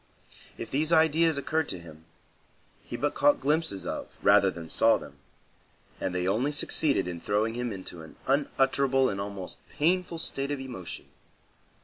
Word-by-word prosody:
If - - -7
these 155 +4 +1
ideas 160 -1 +4
occurred 155 +2 -1
to 90 - -4
him, 80 -1 -14 0.8
he - - -6
but 145 0 0
caught 290 - +3
glimpses 150 - 0
of, - - -4
rather - - +6
than 85 0 -7
saw 115 +7 +4
them, 70 - -12 0.8
and 90 - -2
they 90 0 0
only 120 +9 +1
succeeded 145 - +2
in 85 -1 -5
throwing 105 +2 0
him 120 0 -3
into 95 -4 -7
an 80 - -13
unutterable 135 -1 +2
and 100 0 -4
almost 100 -2 -6 0.2
painful 175 +2 +1
state 140 -3 -2
of 145 -1 -2
emotion. 120 -10 -7
130 Hz, 155 wpm, -28 LUFS, 95-150 Hz, 0.8 s, rather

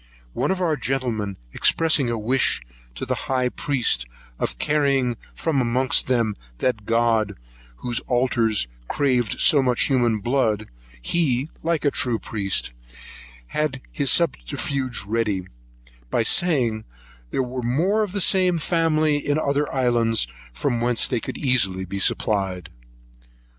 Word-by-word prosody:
One - - -1
of 190 -1 0
our 165 -4 +2
gentlemen 120 -7 -2 0.2
expressing 155 -6 +2
a 115 - -1
wish 115 - +1 0.3
to - - -4
the - - -1 0.2
high 130 -1 +1
priest, 120 - 0 0.3
of - - -2
carrying 140 -5 +1 0.2
from 150 -5 0
amongst 125 +2 +1
them 115 -5 +1 0.2
that 110 - -1
God 115 -3 +2 0.4
whose 120 - -2
altars 120 - +1 0.2
craved 125 -6 0
so 145 - +6
much 125 -2 +2
human 120 -5 +2
blood, 110 -2 0 0.4
he, 140 - +1
like 165 -3 -1
a 145 - +4
true 120 -4 0
priest, 100 - -1 0.8
had 150 -3 -1
his 140 -2 0
subterfuge 130 - 0
ready, 105 -3 -1 0.6
by 115 - +1
saying, 120 -6 +1 0.5
there 130 - 0
were 125 0 -4
more 165 - +1
of 205 -3 -2
the 200 - -1
same 185 -1 +4
family 155 -2 +2
in 145 0 -1
the 155 - 0
other 145 +1 0
islands, 120 - +2 0.3
from 115 - -1
whence 120 -1 +2
they 125 - 0
could - - -6
easily 100 -9 +1
be 100 +2 -5
supplied. 95 -3 0
125 Hz, 135 wpm, -23 LUFS, 110-145 Hz, 0.8 s, so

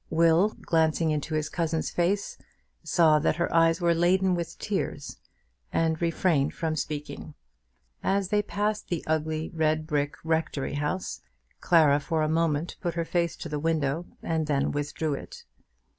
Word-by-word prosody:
Will, 165 +5 +3
glancing 160 0 +1
into 155 +1 -2
his 155 -1 0
cousin's 160 -2 -2
face, 190 +4 0 0.5
saw 160 -2 +4
that 150 - +1
her 170 +1 -1
eyes 165 0 +4
were 170 -1 +3
laden 185 +2 +3
with 170 -1 -3
tears, - - -3 0.5
and 160 0 0
refrained 165 -4 +1
from 160 -1 -1
speaking. 150 0 -5 0.7
As 195 -1 0
they 210 0 +3
passed 210 +1 -2
the 170 -3 -3
ugly 155 0 -1
red 155 -1 +1
brick 145 -2 -1
rectory 160 -4 -1
house, 150 +6 -3 0.4
Clara 155 -5 +4
for 160 +1 -1
a - - +1
moment 160 0 0
put 175 -2 -2
her 170 -1 -1
face 170 0 0
to - - -6
the 150 -1 -3
window, 160 +1 0 0.2
and 160 -2 -1
then 140 -2 +1
withdrew 145 +1 -2
it. 140 - -8
160 Hz, 155 wpm, -27 LUFS, 155-170 Hz, 0.7 s, saw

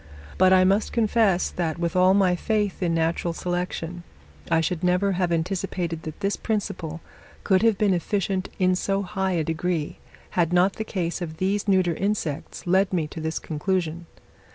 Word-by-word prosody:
But 185 0 +6
I 185 0 +6
must 195 +3 +2
confess, 215 -5 +2
that, 165 -2 -2
with 170 +1 -2
all 185 +1 +5
my 190 -3 +3
faith 205 +1 -1
in 170 -2 +1
natural 165 +1 0
selection, 175 -1 -3 0.5
I 165 -1 +3
should 165 +2 -1
never 180 +2 +2
have 180 -2 0
anticipated 170 -1 -2
that 155 -1 -8
this 200 +1 0
principle 170 -7 -3 0.4
could 190 -2 +3
have 225 -3 +3
been 205 -3 +3
efficient 190 +1 -1
in 185 -1 +3
so 195 +2 -1
high 190 -1 -1
a 165 -2 +1
degree, 165 0 -2 0.3
had 170 -2 +1
not 180 +2 +3
the 220 - -2
case 180 -4 -3
of 160 -2 -5
these 195 +4 0
neuter 185 -3 +3
insects 170 -5 -3
led 190 +2 +3
me 170 -4 0
to 160 - -7
this 160 0 -2
conclusion. 170 +1 -2
180 Hz, 175 wpm, -24 LUFS, 170-195 Hz, 0.5 s, But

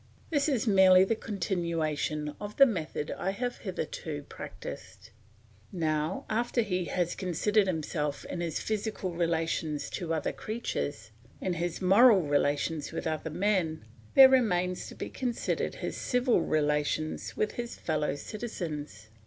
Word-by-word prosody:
This 290 -1 +2
is 255 -6 +1
merely 190 -3 +7
the 195 - +1
continuation 165 -7 -2
of 205 0 -6
the 275 - +9
method 165 - -3
I 190 - -1
have 245 +5 -3
hitherto - - -4
practised. - - -9 0.6
Now 160 -1 -1
after 235 +2 +1
he 180 -4 -1
has 175 0 -1
considered 195 +3 +1
himself 150 -4 -2
in 170 - -4
his 165 -3 -2
physical 215 -4 -2
relations 165 -3 -1
to 170 -3 -4
other 160 -3 0
creatures, 145 - -4 0.3
in 185 - -1
his 175 +2 -3
moral 200 +1 +7
relations 145 +1 0
with - - -4
other 160 0 -2
men, 170 - 0 0.3
there 270 -1 +11
remains 185 -9 +2
to - - -10
be - - -5
considered 245 -3 -2
his - - -4
civil 250 -1 +2
relations 150 +1 0
with 215 - +1
his 240 0 -5
fellow 150 -3 -1
citizens. 155 - -6
180 Hz, 135 wpm, -29 LUFS, 155-215 Hz, 0.6 s, there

